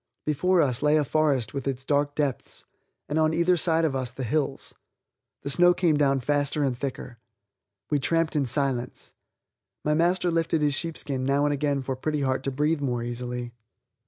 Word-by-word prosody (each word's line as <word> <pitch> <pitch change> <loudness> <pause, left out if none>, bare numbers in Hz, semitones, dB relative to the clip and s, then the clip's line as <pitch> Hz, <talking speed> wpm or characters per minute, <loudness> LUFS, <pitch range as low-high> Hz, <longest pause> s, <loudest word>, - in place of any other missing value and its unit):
Before 175 +4 +2
us 130 -3 -1
lay 150 +1 +4
a 150 - +2
forest 140 -6 +1
with 140 -1 -4
its 130 -1 -3
dark 145 0 0
depths, 145 -4 -3 0.4
and 150 +2 -1
on 160 0 +2
either 170 +2 +3
side 165 -1 +1
of 145 -4 -1
us 130 -2 -2
the 130 +1 -6
hills. 140 +2 -2 0.7
The 140 - -1
snow 175 +3 +5
came 170 -4 +2
down 140 -2 +2
faster 145 +2 0
and 135 -3 0
thicker. 125 -2 -6 0.7
We 145 - +2
tramped 165 +3 0
in 140 -3 +1
silence. 130 -1 -2 0.7
My 150 - +2
master 175 +2 +2
lifted 165 -1 0
his 145 -1 +2
sheepskin 145 -4 -2
now 140 +2 +2
and 145 - +1
again 140 -1 -1
for 130 0 -3
Pretty 150 +3 -2
Heart 130 -1 0
to 135 - -1
breathe 150 +3 0
more 125 -4 -1
easily. 120 0 -5
145 Hz, 185 wpm, -26 LUFS, 130-155 Hz, 0.7 s, snow